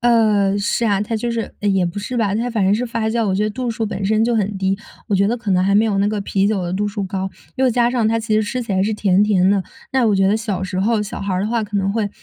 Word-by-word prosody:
呃， 215 -4 +3
是 205 +3 0
啊， 200 -3 +2
它 210 +2 -2
就 235 +2 -2
是 230 -1 -3
也 195 -3 +2
不 170 +4 -5
是 225 +5 -4
吧， 205 -4 +1
它 235 +3 -1
反 220 -4 0
正 195 +2 +3
是 245 +3 -1
发 230 -1 -2
酵。 225 0 0
我 190 - 0
觉 205 - +1
得 215 - -1
度 245 +2 -3
数 225 0 -2
本 200 -1 -4
身 220 +2 +2
就 235 0 +1
很 205 -2 0
低， 190 0 0 0.3
我 205 - +1
觉 195 +1 +3
得 240 - 0
可 225 -4 -4
能 185 -1 +3
还 200 +1 +2
没 215 +2 +5
有 205 -3 0
那 200 - +2
个 210 -1 -2
啤 195 0 0
酒 200 -4 0
的 175 0 -3
度 205 +2 -1
数 205 -1 -4
高， 190 0 -3 0.3
又 265 0 +3
加 240 0 +2
上 240 -3 +1
它 225 +1 +1
其 215 -1 -1
实 215 - +3
吃 245 +4 -3
起 215 - -4
来 190 - +2
是 210 +3 0
甜 200 -1 +3
甜 190 -3 +3
的。 200 -1 +2 0.3
那 265 -2 +2
我 210 - +3
觉 195 0 +3
得 205 +3 +3
小 210 -4 -3
时 185 0 -2
候， 215 +2 +1
小 210 - -6
孩 195 -2 -2
儿 185 - 0
的 205 - -1
话 230 -1 0
可 210 0 -4
能 195 0 0
会 215 -1 -1
210 Hz, 345 characters per minute, -19 LUFS, 195-225 Hz, 0.3 s, 没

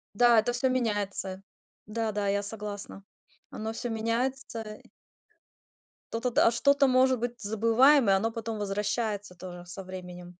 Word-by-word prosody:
Да, 240 0 +6
это 240 +3 0
всё 260 +2 +1
меняется. 205 -6 -2 0.5
Да 225 0 -2
да, 205 -1 -1
я 200 0 +1
согласна. 205 -2 -7 0.5
Оно 220 +1 -4
всё 240 +1 -4
меняется 230 +2 -2
и - - -18 1.3
то-то, 230 +2 -1
д - - +2
а, 230 - +5
что-то, 280 +3 +3
может 255 0 +4
быть, 240 +1 -4
забываем, 230 +4 +4
и - - +6
оно 220 +4 +1
потом 225 -1 -5
возвращается 205 -1 -2
тоже 175 0 -9
со 180 +2 -8
временем. 180 -1 -9
220 Hz, 150 wpm, -28 LUFS, 200-240 Hz, 1.3 s, Да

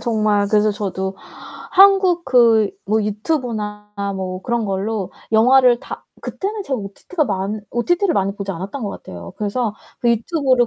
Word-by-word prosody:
정말 215 -3 +1
그래서 215 0 +4
저도 190 -2 -3 0.5
한국 380 -3 +5
그 230 -5 +4
뭐 215 +2 +1
유튜브나 210 -2 -3 0.2
뭐 185 -1 -4
그런 235 -2 -1
걸로 195 0 -2 0.2
영화를 250 +2 +5
다 - - -8 0.2
그때는 410 +1 -4
제가 270 -7 -2
OTT가 210 - -3
많 205 0 -2
OTT를 350 +9 +1
많이 195 +1 0
보지 200 -1 -5
않았던 195 +9 -6
것 205 - -2
같아요. 85 -1 -9
그래서 210 +1 -2 0.3
그 235 - +3
유튜브를 255 +1 +2
215 Hz, 320 characters per minute, -20 LUFS, 200-255 Hz, 0.5 s, 한국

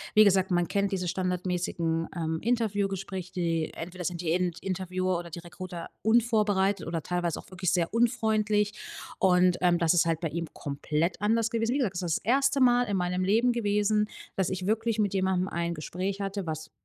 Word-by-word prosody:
wie 215 - +9
gesagt, 190 -2 +3
man 175 -1 +1
kennt 200 +2 0
diese 185 -2 -2
standardmäßigen, 180 -2 -1
ähm, 160 -1 -2
Interviewgespräche, 195 -5 -1
die 165 -3 -1
entweder 180 +2 -6
sind 170 0 -3
die 165 -2 -1
Int 175 -1 0
Interviewer 185 -1 -1
oder 170 0 -8
die 170 +1 -7
Recruiter 175 0 -8
unvorbereitet 210 -5 +2
oder 165 -2 -3
teilweise 175 -1 -1
auch - - -13
wirklich 185 -1 -1
sehr 175 -1 0
unfreundlich. 220 -3 +2 0.5
Und, 180 -1 +4
ähm, 175 -1 +4
das 165 -1 +3
ist 175 - +4
halt 165 -1 0
bei 165 - -1
ihm 170 +2 -3
komplett 150 +5 -2
anders 225 +2 +2
gewesen. 230 +1 0
Wie - - +1
gesagt, 240 -9 0
das 175 - -2
ist 170 -3 0
das - - -12
1. 275 +4 +2
Mal 245 -1 +5
in 205 -4 -1
meinem 180 0 0
Leben 225 +6 +3
gewesen, 210 -2 +1 0.3
dass 190 -2 0
ich 185 -1 -3
wirklich 225 +2 0
mit 205 -2 +1
jemandem 190 -1 +1
ein 170 -2 -2
Gespräch 185 +5 -4
hatte, 195 -2 -3
was 155 0 -5
185 Hz, 190 wpm, -28 LUFS, 175-210 Hz, 0.5 s, wie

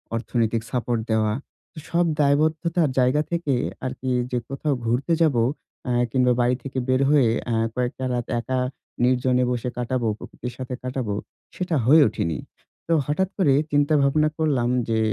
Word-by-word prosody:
অর্থনৈতিক 115 -1 0
সাপোর্ট 120 -2 -1
দেওয়া। 110 -1 +2 0.4
তো, - - -23
সব 170 0 +2
দায়বদ্ধতার 155 +2 +2
জায়গা 130 +4 +3
থেকে 170 -5 0 0.3
আরকি 130 0 -4 0.2
যে 125 - 0
কোথাও 140 +1 -1
ঘুরতে 125 +8 +1
যাবো 130 -8 +3 0.5
আ - - +1 0.2
কিংবা 125 0 +3
বাড়ি 125 +1 +3
থেকে 135 -1 -6
বের 130 +1 +2
হয়ে 140 -6 +5 0.2
অ্যা 115 -2 0 0.2
কয়েকটা 125 +1 -2
রাত 120 -1 -1
একা 130 +2 -2 0.4
নির্জনে 125 0 +3
বসে 125 0 -2
কাটাবো, 125 -1 -1
প্রকৃতির 125 -1 -8
সাথে 130 -1 -5
কাটাবো 125 -5 -2 0.4
সেটা 180 -2 -1
হয়ে 150 +4 +7
ওঠেনি। 85 -7 -2 0.5
তো 165 - +4
হঠাৎ 190 +6 0
করে 160 -8 +4 0.2
চিন্তা 145 +1 +3
ভাবনা 150 +2 +3
করলাম 140 -7 +1 0.2
যে, 110 -1 +1
130 Hz, 155 wpm, -23 LUFS, 120-150 Hz, 0.5 s, হয়ে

